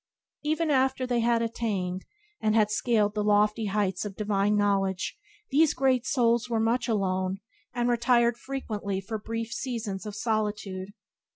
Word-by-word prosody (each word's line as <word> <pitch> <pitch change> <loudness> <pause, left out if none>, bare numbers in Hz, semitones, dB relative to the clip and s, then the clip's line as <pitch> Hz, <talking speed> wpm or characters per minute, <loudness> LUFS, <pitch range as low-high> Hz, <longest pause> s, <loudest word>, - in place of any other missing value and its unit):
Even 310 +1 0
after 265 -1 +2
they 245 -1 0
had 230 0 +2
attained, 195 -6 -2 0.4
and 215 0 +2
had 210 -2 +3
scaled 210 -2 +2
the 210 -1 -1
lofty 210 +1 +3
heights 195 -2 0
of 205 -2 -6
divine 205 0 +1
knowledge 195 -2 0 0.4
these 300 +1 +4
Great 260 -1 +2
Souls 240 -4 +2
were 230 -1 +1
much 230 +4 +1
alone, 190 -3 0 0.3
and 240 -1 -1
retired 235 0 +3
frequently 215 -7 -4
for 215 +3 -5
brief 230 +1 -4
seasons 220 -6 -4
of 210 - -6
solitude. 210 -3 -2
220 Hz, 150 wpm, -27 LUFS, 205-240 Hz, 0.4 s, these